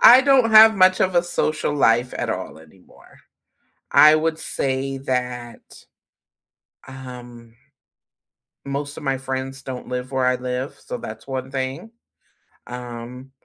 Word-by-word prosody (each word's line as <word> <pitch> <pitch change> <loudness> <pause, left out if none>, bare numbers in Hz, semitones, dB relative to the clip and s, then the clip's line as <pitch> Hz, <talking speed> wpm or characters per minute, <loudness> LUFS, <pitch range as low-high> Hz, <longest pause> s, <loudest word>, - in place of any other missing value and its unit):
I 250 +2 +9
don't 265 -4 +3
have 220 0 +8
much 185 0 +4
of 185 -1 +1
a 175 - +4
social 155 -3 -2
life 120 -3 +2
at - - -3
all - - -5
anymore. 80 +4 -20 0.7
I 155 +1 +7
would 160 0 -1
say 135 -2 -3
that, 125 -3 -4 1.3
um, 120 -3 -11 1.1
most 140 +1 -5
of - - -9
my 135 -2 -1
friends 135 0 -5
don't 130 -2 -7
live 125 +1 -5
where 130 -1 +1
I 125 0 +2
live, 125 +2 -5
so - - -7
that's 110 -1 -9
one 130 -1 -5
thing, 135 +10 -4 0.8
um, 125 +1 -9
130 Hz, 135 wpm, -21 LUFS, 125-145 Hz, 1.3 s, I